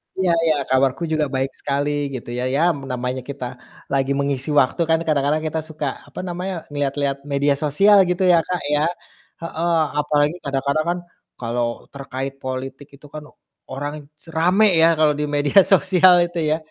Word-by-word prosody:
Iya 185 Hz, -2 st, +1 dB
iya 155 Hz, -2 st, +3 dB
kabarku 135 Hz, +3 st, +1 dB
juga 155 Hz, -1 st, +1 dB
baik 135 Hz, +1 st, -1 dB
sekali, 145 Hz, +1 st, -1 dB, 0.3 s
gitu 120 Hz, -, -7 dB
ya. 125 Hz, +1 st, -2 dB
Ya, 150 Hz, -, +2 dB
namanya 130 Hz, -3 st, -4 dB
kita 140 Hz, -2 st, -5 dB, 0.5 s
lagi 135 Hz, 0 st, +1 dB
mengisi 140 Hz, 0 st, -2 dB
waktu 130 Hz, +6 st, -1 dB
kan 160 Hz, -, +3 dB
kadang-kadang 150 Hz, +1 st, +1 dB
kita 160 Hz, +1 st, -2 dB
suka, 155 Hz, -2 st, -4 dB, 0.2 s
apa -, -, -10 dB
namanya, 180 Hz, -1 st, -5 dB
ngelihat-lihat 140 Hz, -1 st, -1 dB
media 140 Hz, 0 st, +1 dB
sosial 195 Hz, +8 st, +4 dB
gitu 180 Hz, +1 st, 0 dB
ya, 175 Hz, -2 st, +5 dB
Kak, 180 Hz, -1 st, -2 dB
ya, 150 Hz, +1 st, +2 dB, 0.6 s
heeh. 165 Hz, 0 st, 0 dB, 0.2 s
Apalagi 150 Hz, +1 st, +1 dB
kadang-kadang 140 Hz, +2 st, -1 dB
kan 175 Hz, +1 st, -1 dB, 0.4 s
kalau 120 Hz, 0 st, -1 dB, 0.3 s
terkait 135 Hz, 0 st, -5 dB
politik 130 Hz, +2 st, -6 dB
itu 145 Hz, -, -18 dB
kan 155 Hz, -1 st, -7 dB, 0.5 s
orang 145 Hz, +2 st, -6 dB, 0.2 s
rame 180 Hz, +7 st, +3 dB
ya 165 Hz, 0 st, +5 dB
kalau 155 Hz, -1 st, +3 dB
di 150 Hz, 0 st, -3 dB
media 145 Hz, +6 st, +3 dB
sosial 185 Hz, -1 st, +5 dB
itu 175 Hz, 0 st, -5 dB
ya, 155 Hz, -, +2 dB
145 Hz, 160 wpm, -21 LUFS, 135-165 Hz, 0.6 s, ya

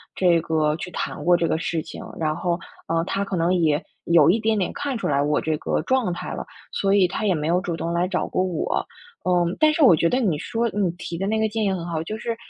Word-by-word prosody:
这 175 Hz, -3 st, +4 dB
个 160 Hz, -2 st, +1 dB
去 180 Hz, -, -6 dB
谈 -, -, -4 dB
过 175 Hz, 0 st, +6 dB
这 170 Hz, -1 st, 0 dB
个 160 Hz, -, 0 dB
事 165 Hz, -1 st, -1 dB
情。 -, -, -9 dB, 0.2 s
然 155 Hz, -1 st, 0 dB
后， 170 Hz, +1 st, -1 dB, 0.3 s
呃， 165 Hz, 0 st, +1 dB
他 195 Hz, +3 st, -2 dB
可 195 Hz, -, -3 dB
能 170 Hz, +1 st, +2 dB
也 160 Hz, -3 st, +2 dB, 0.2 s
有 170 Hz, -3 st, +5 dB
一 220 Hz, -, +1 dB
点 220 Hz, 0 st, +1 dB
点 190 Hz, -, 0 dB
看 280 Hz, -2 st, -3 dB
出 230 Hz, -, -5 dB
来 140 Hz, -1 st, +2 dB
我 150 Hz, +1 st, +1 dB
这 155 Hz, -1 st, -1 dB
个 -, -, -1 dB
状 240 Hz, 0 st, +1 dB
态 -, -, -6 dB
了， -, -, -5 dB, 0.3 s
所 195 Hz, 0 st, +1 dB
以 190 Hz, -3 st, +4 dB
他 215 Hz, +4 st, -3 dB
也 190 Hz, -4 st, +3 dB
没 150 Hz, -1 st, -2 dB
有 175 Hz, +2 st, +3 dB
主 180 Hz, -3 st, -3 dB
动 165 Hz, +1 st, -3 dB
来 170 Hz, +1 st, +1 dB
找 185 Hz, -1 st, -1 dB
过 -, -, -1 dB
我。 180 Hz, -4 st, -1 dB, 0.4 s
嗯， 175 Hz, -1 st, +1 dB
但 310 Hz, -1 st, +5 dB
是 305 Hz, 0 st, +2 dB
我 215 Hz, -11 st, +8 dB
觉 165 Hz, +2 st, +2 dB
得 255 Hz, -, +1 dB
你 200 Hz, -11 st, +1 dB
说 235 Hz, +7 st, -1 dB
你 200 Hz, -3 st, 0 dB
提 175 Hz, -, -6 dB
的 190 Hz, +3 st, -2 dB
那 220 Hz, +1 st, +1 dB
个 220 Hz, -, +2 dB
建 220 Hz, +1 st, -2 dB
议 200 Hz, -, +2 dB
很 180 Hz, -3 st, -3 dB
好， 165 Hz, -2 st, -2 dB
就 210 Hz, +7 st, -5 dB
是 230 Hz, +1 st, -3 dB
180 Hz, 290 characters per minute, -23 LUFS, 165-205 Hz, 0.4 s, 我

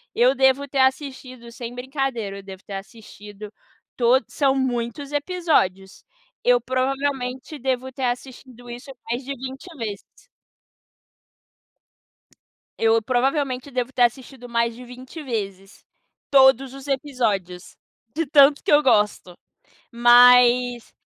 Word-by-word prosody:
Eu 245 Hz, +3 st, +4 dB
devo 265 Hz, +1 st, +2 dB
ter 275 Hz, 0 st, -3 dB
assistido, 260 Hz, -2 st, -2 dB
sem 235 Hz, 0 st, -8 dB
brincadeira, 250 Hz, -6 st, -4 dB
eu -, -, -13 dB
devo 190 Hz, -1 st, -11 dB
ter 200 Hz, -, -10 dB
assistido 210 Hz, 0 st, -11 dB, 0.5 s
to 245 Hz, +2 st, +4 dB
são 275 Hz, -2 st, +1 dB
muitos 260 Hz, +1 st, -3 dB
episódios. 290 Hz, -, -1 dB, 0.4 s
Eu, 245 Hz, 0 st, +4 dB
provavelmente, 260 Hz, +2 st, -3 dB
devo 260 Hz, 0 st, -2 dB
ter 265 Hz, +1 st, -7 dB
assistido 245 Hz, 0 st, -6 dB
isso 245 Hz, +3 st, -9 dB, 0.2 s
mais 240 Hz, +3 st, -2 dB
de 275 Hz, -, -4 dB
20 265 Hz, +1 st, -8 dB
vezes. 210 Hz, -5 st, -5 dB, 2.8 s
Eu, 225 Hz, 0 st, +3 dB
provavelmente, 260 Hz, +2 st, -1 dB
devo 250 Hz, 0 st, -2 dB
ter 250 Hz, -2 st, +2 dB
assistido 250 Hz, +1 st, -2 dB
mais 235 Hz, -1 st, -1 dB
de 250 Hz, +1 st, -11 dB
20 255 Hz, +6 st, -10 dB
vezes 200 Hz, -6 st, -6 dB, 0.5 s
todos 265 Hz, -1 st, +4 dB
os 275 Hz, +1 st, -11 dB
episódios, 225 Hz, -, -2 dB, 0.4 s
de 330 Hz, +1 st, -1 dB
tanto 285 Hz, 0 st, +5 dB
que -, -, -1 dB
eu 295 Hz, 0 st, +5 dB
gosto. 210 Hz, -7 st, +1 dB, 0.6 s
Mas 245 Hz, 0 st, +5 dB
250 Hz, 120 wpm, -22 LUFS, 235-270 Hz, 2.8 s, tanto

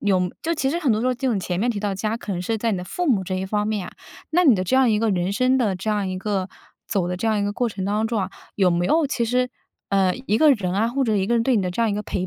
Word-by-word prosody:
有 185 Hz, -3 st, +1 dB
就 330 Hz, -, 0 dB
其 275 Hz, -4 st, 0 dB
实 330 Hz, +5 st, -1 dB
很 285 Hz, -8 st, +2 dB
多 215 Hz, -, 0 dB
时 250 Hz, -, 0 dB
候 255 Hz, -, +2 dB
这 250 Hz, +2 st, -3 dB
种 225 Hz, -6 st, +1 dB
前 180 Hz, -1 st, -3 dB
面 235 Hz, +5 st, +1 dB
提 210 Hz, -4 st, -3 dB
到 205 Hz, -1 st, -1 dB
家 215 Hz, +4 st, -2 dB
可 210 Hz, -, -5 dB
能 175 Hz, -1 st, -3 dB
是 225 Hz, +4 st, -1 dB
在 230 Hz, +2 st, 0 dB
你 205 Hz, -, 0 dB
的 180 Hz, -, -5 dB
父 355 Hz, -, -3 dB
母 200 Hz, -6 st, +2 dB
这 185 Hz, +1 st, -3 dB
一 190 Hz, +1 st, -3 dB
方 210 Hz, +1 st, -1 dB
面 210 Hz, -4 st, -2 dB
啊， -, -, -12 dB, 0.4 s
那 355 Hz, +3 st, +2 dB
你 270 Hz, -7 st, +7 dB
的 185 Hz, -, -1 dB
这 185 Hz, +8 st, +1 dB
样 260 Hz, -3 st, +4 dB
一 210 Hz, -, +2 dB
个 225 Hz, +1 st, +1 dB
人 180 Hz, 0 st, 0 dB
生 255 Hz, +4 st, +2 dB
的 220 Hz, -7 st, +1 dB
这 190 Hz, +4 st, -5 dB
样 210 Hz, -2 st, 0 dB
一 185 Hz, 0 st, -3 dB
个 195 Hz, -1 st, -2 dB, 0.4 s
走 190 Hz, -5 st, -1 dB
的 180 Hz, -, -2 dB
这 195 Hz, -, -3 dB
样 220 Hz, -1 st, +2 dB
一 -, -, 0 dB
个 205 Hz, -, 0 dB
过 245 Hz, +3 st, 0 dB
程 195 Hz, -3 st, -5 dB
当 210 Hz, +2 st, 0 dB
中 225 Hz, -2 st, -1 dB
啊， 190 Hz, 0 st, -3 dB, 0.3 s
有 190 Hz, -3 st, +3 dB
没 175 Hz, 0 st, +1 dB
有 315 Hz, -, +3 dB
其 250 Hz, -4 st, -1 dB
实， 250 Hz, +2 st, +1 dB, 0.4 s
呃， 190 Hz, -2 st, +2 dB
一 210 Hz, -, +2 dB
个 310 Hz, +4 st, +6 dB
人 185 Hz, -7 st, -2 dB
啊 210 Hz, +3 st, +2 dB
或 270 Hz, +3 st, -1 dB
者 220 Hz, -5 st, +1 dB
一 190 Hz, -1 st, 0 dB
个 235 Hz, -, 0 dB
人 230 Hz, -, +2 dB
对 250 Hz, 0 st, +2 dB
你 200 Hz, -, +1 dB
的 180 Hz, -, -2 dB
这 180 Hz, -, -3 dB
样 230 Hz, -2 st, +2 dB
一 -, -, -1 dB
个 210 Hz, -, -3 dB
陪 185 Hz, -2 st, -3 dB
210 Hz, 370 characters per minute, -23 LUFS, 190-240 Hz, 0.4 s, 你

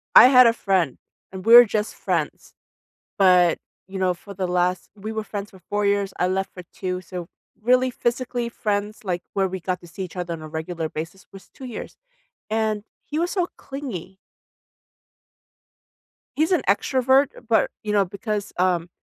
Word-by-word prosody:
I -, -, +11 dB
had 255 Hz, -1 st, +8 dB
a 230 Hz, -, +5 dB
friend, 185 Hz, -, 0 dB, 0.3 s
and 190 Hz, +1 st, -8 dB
we're 240 Hz, +1 st, +10 dB
just 210 Hz, 0 st, -2 dB
friends. -, -, -3 dB, 0.6 s
But, 180 Hz, -3 st, +5 dB, 0.3 s
you 195 Hz, -, -7 dB
know, 185 Hz, -1 st, +2 dB
for 200 Hz, +3 st, -12 dB
the 185 Hz, -1 st, -2 dB
last 180 Hz, 0 st, 0 dB
we 210 Hz, +2 st, -6 dB
were 220 Hz, -1 st, -2 dB
friends 205 Hz, -1 st, -6 dB
for 190 Hz, -, -15 dB
4 205 Hz, +4 st, -2 dB
years, 200 Hz, -1 st, +1 dB
I 180 Hz, -, +3 dB
left 190 Hz, +1 st, -2 dB
for 180 Hz, -, -9 dB
2, 185 Hz, 0 st, -3 dB
so, 180 Hz, -1 st, -7 dB, 0.3 s
really, 255 Hz, +3 st, +3 dB
physically 245 Hz, -1 st, -2 dB
friends, 210 Hz, -1 st, -2 dB
like, 175 Hz, -2 st, -1 dB
where 195 Hz, -1 st, +1 dB
we 190 Hz, 0 st, -5 dB
got 185 Hz, +1 st, -2 dB
to 175 Hz, -, -13 dB
see 190 Hz, +3 st, -6 dB
each 185 Hz, -, -8 dB
other 175 Hz, -1 st, -3 dB
on 165 Hz, -, -7 dB
a 155 Hz, -, -7 dB
regular 160 Hz, +1 st, -4 dB
basis 165 Hz, +5 st, -7 dB
was 195 Hz, -2 st, -13 dB
2 265 Hz, -, -10 dB
years, 240 Hz, -, -7 dB, 0.5 s
and 215 Hz, -1 st, 0 dB, 0.2 s
he 300 Hz, -, -3 dB
was 350 Hz, +2 st, 0 dB
so 360 Hz, -3 st, 0 dB
clingy. 240 Hz, -, -7 dB, 2.2 s
He's 320 Hz, +5 st, +2 dB
an 360 Hz, -, +3 dB
extrovert, 260 Hz, +6 st, +3 dB, 0.2 s
but, 225 Hz, -1 st, +3 dB
you 210 Hz, -, -2 dB
know, 200 Hz, -1 st, +3 dB
because, 205 Hz, +2 st, -4 dB
um, 175 Hz, -2 st, +1 dB
200 Hz, 175 wpm, -23 LUFS, 180-230 Hz, 2.2 s, I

